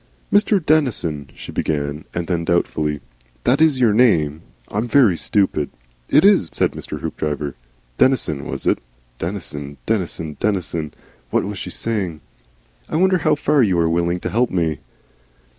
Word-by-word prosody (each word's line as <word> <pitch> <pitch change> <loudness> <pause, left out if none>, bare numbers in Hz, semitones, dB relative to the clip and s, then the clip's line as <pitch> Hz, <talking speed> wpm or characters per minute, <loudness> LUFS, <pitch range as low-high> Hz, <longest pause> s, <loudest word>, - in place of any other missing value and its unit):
"Mr. 205 0 +4
Denison," 105 - +1
she - - -9
began, 75 0 -2
and 85 -1 -3
then, 85 -1 -1
doubtfully, 75 -4 0 0.4
"That 130 +5 +3
is 155 -5 +4
your 115 -4 +4
name? 80 -10 +3 0.3
I'm 110 +4 -2
very 120 -7 +5
stupid 95 -5 0 0.2
" - - -37
"It 155 - +6
is," 200 - +5
said - - +1
Mr. - - -6
Hoopdriver. 75 -2 -3 0.5
(Denison, 110 - +2
was - - -5
it? - - +2 0.4
Denison, 75 -6 -5
Denison, 85 -7 -2
Denison. 85 -7 -1 0.4
What - - +1
was 100 -1 -5
she - - -5
saying?) 95 -9 -3 0.7
"I - - -3
wonder 185 +2 +3
how 155 -1 +3
far 145 0 +2
you 95 -7 +3
are 85 -1 +3
willing 85 +1 +1
to - - -3
help 120 +3 +2
me?" 80 -5 0
90 Hz, 155 wpm, -20 LUFS, 75-125 Hz, 0.7 s, It